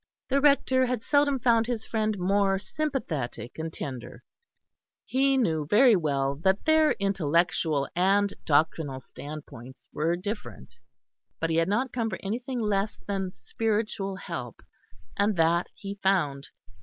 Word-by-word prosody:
The 275 +1 +2
Rector 260 -3 +4
had 245 -2 -2
seldom 285 -1 +3
found 230 -2 +3
his 235 -3 -3
friend 215 -2 -1
more 195 +1 +2
sympathetic 185 - -4
and 160 0 -3
tender; 130 -4 -7 0.8
he 270 +1 +2
knew 160 - +1
very 230 - +6
well 140 -5 0
that 190 +5 +1
their 315 -1 +4
intellectual 170 -6 +1
and 195 +3 +3
doctrinal 150 -3 +1
standpoints 140 -3 -10
were 165 +3 +1
different, 175 - -7 0.6
but 165 0 -1
he 160 - +1
had 165 +2 +2
not 235 +5 0
come 230 -2 -1
for 190 - -4
anything 245 +5 -3
less 210 -1 0
than 195 -2 -2
spiritual 205 - -2
help, 125 - -7 0.5
and 205 +1 +2
that 170 +1 +2
he 200 0 -6
found. 150 -8 +1
195 Hz, 135 wpm, -27 LUFS, 155-225 Hz, 0.8 s, very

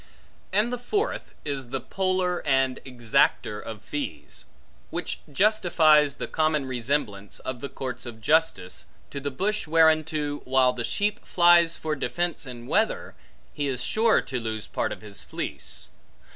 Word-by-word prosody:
And 215 +5 +2
the 245 - -2
fourth, 410 - -2
is 135 -4 -3
the 135 +1 -2
poller 185 +3 0
and 135 -2 +2
exacter 120 -4 +1
of 110 -1 -8
fees; 145 -1 -6 0.4
which - - -3
justifies 155 -6 +4
the - - -4
common 155 -3 +1
resemblance 120 -5 -2
of 125 -2 -6
the 140 - -4
courts 125 -1 -5
of 115 -2 -8
justice, 150 - +1 0.2
to 140 - -4
the 145 +1 -3
bush 200 +8 -1
whereunto, 155 -2 +3
while 130 -1 +3
the 120 -1 -3
sheep 205 - -1
flies 175 -1 +5
for 155 -1 -2
defence 170 +1 -2
in 120 -2 -8
weather, - - +1 0.4
he 145 -1 -2
is 125 -2 -2
sure 220 - +3
to 130 - -4
lose 110 -2 -4
part - - -2
of - - -6
his 105 -2 -2
fleece. - - -5
145 Hz, 150 wpm, -26 LUFS, 125-170 Hz, 0.4 s, flies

